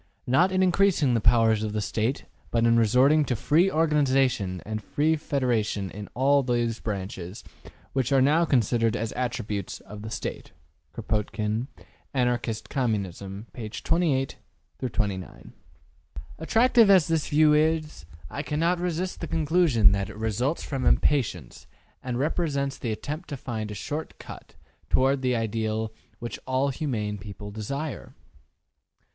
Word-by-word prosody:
Not 165 +10 +3
in 190 0 +2
increasing 180 -7 +3
the 115 - +1
powers 110 -1 +4
of 105 -1 -3
the 110 - -1
State, 110 +5 -1 0.2
but 115 0 +1
in 115 0 +5
resorting 125 +7 +4
to 125 - -1
free 160 - +3
organization 135 - +2
and 110 0 -4
free 155 +8 +1
federation 120 - -1
in 105 0 -8
all 140 +3 +4
those 120 -3 0
branches 95 -2 -5 0.5
which 130 -2 0
are 135 - +5
now 150 +6 +4
considered 115 - +2
as 110 0 -2
attributes 115 -6 -3
of 105 0 -10
the 110 - -6
State.'' - - -5 0.4
Kropotkin, 105 +2 -2 0.5
``Anarchist 120 -3 0
Communism,'' 100 - -3
pp. 110 -3 -7
28 155 -6 +1 0.5
29. 100 -4 -4 0.9
Attractive 230 +5 +4
as 185 -6 +6
this 160 -2 0
view 150 0 +5
is, 155 - 0 0.2
I 140 - -5
cannot 165 +4 0
resist 180 +1 -2
the 165 - -3
conclusion 155 - +3
that 100 0 -1
it 105 - -10
results 110 - -1
from 135 -3 -3
impatience 90 - +1 0.3
and 125 -2 -3
represents 140 -1 -1
the 120 - -2
attempt 150 - -5
to 145 - -4
find 110 -4 -4
a 105 - -6
short 150 +9 -5
cut - - -11 0.3
toward 135 +1 +3
the 125 -1 +1
ideal 110 -1 -2 0.2
which 120 0 -6
all 130 +2 +1
humane 110 -8 -3
people 105 +1 -8
desire. 140 +8 -5
125 Hz, 140 wpm, -26 LUFS, 110-150 Hz, 0.9 s, as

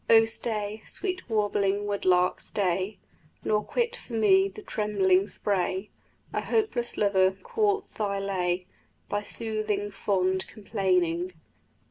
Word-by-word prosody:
O 225 0 +8
stay, 215 -2 -2
sweet 370 -6 -4
warbling 205 -2 +1
wood 205 -1 -2
lark, 180 0 +3
stay, 190 +1 -1 0.5
Nor 210 0 +1
quit 480 0 -1
for 255 - -12
me 195 -3 +5
the 190 - -10
trembling 200 -2 +2
spray, 190 0 0 0.4
A - - 0
hopeless 410 - 0
lover 190 -2 +4
courts 410 -3 0
thy 200 -2 -1
lay, 185 -2 -1 0.5
Thy 205 - 0
soothing, 210 -2 -2
fond 190 -2 0
complaining. 185 -4 0
205 Hz, 120 wpm, -27 LUFS, 190-220 Hz, 0.5 s, O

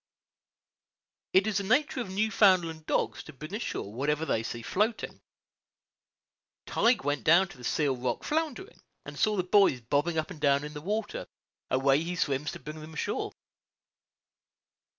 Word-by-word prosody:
It 190 +1 +5
is 210 -2 +1
the - - -3
nature 255 +5 +1
of 230 - -5
Newfoundland 185 -6 +2
dogs - - 0
to 155 - -12
bring 155 +6 -9
ashore 205 - -4
whatever 150 +5 0
they 110 - 0
see 115 +1 -5
floating. 215 - -1 1.4
Tige 235 - +2
went 145 -3 -1
down 175 +4 +5
to - - -13
the - - -12
Seal 140 +1 +1
Rock 125 0 -3
floundering, 320 - -3 0.2
and - - -8
saw 215 -1 +3
the 185 - +1
buoys 185 -7 +4
bobbing 145 +8 0
up 155 +2 -1
and 160 -4 -10
down 140 -1 +3
in 150 0 -6
the 150 - -7
water; 210 +5 -3 0.4
away 135 +2 +3
he 175 +2 -3
swims 145 -2 -1
to - - -8
bring 155 +1 -8
them 160 +1 -10
ashore. - - -2
160 Hz, 160 wpm, -29 LUFS, 145-205 Hz, 1.4 s, It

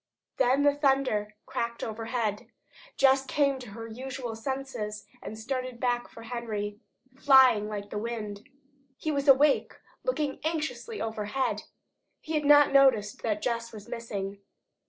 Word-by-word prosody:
Then 265 +3 +3
the 290 0 +5
thunder 270 -7 +1
cracked 235 0 -3
overhead. 225 -1 -3 0.5
Jess 270 0 +5
came 275 0 +1
to 245 -3 -9
her 225 +3 -8
usual 245 0 -6
senses 225 -4 -4 0.2
and 220 - -7
started 255 +1 -4
back 245 -1 0
for 230 - -12
Henry, 215 -3 -4 0.4
flying 255 -6 +6
like 205 -1 -6
the 210 - -2
wind. 210 -3 -5 0.5
He 310 - -2
was 280 -1 -1
awake, 280 +1 +5 0.3
looking 305 - -1
anxiously 315 - -3
overhead. 220 +3 -2 0.5
He 320 - -6
had 300 -1 0
not 290 -1 +7
noticed 255 -7 +4
that 210 -2 -1
Jess 230 -1 -2
was 210 -1 -11
missing. 205 -5 -5
240 Hz, 135 wpm, -28 LUFS, 215-275 Hz, 0.5 s, not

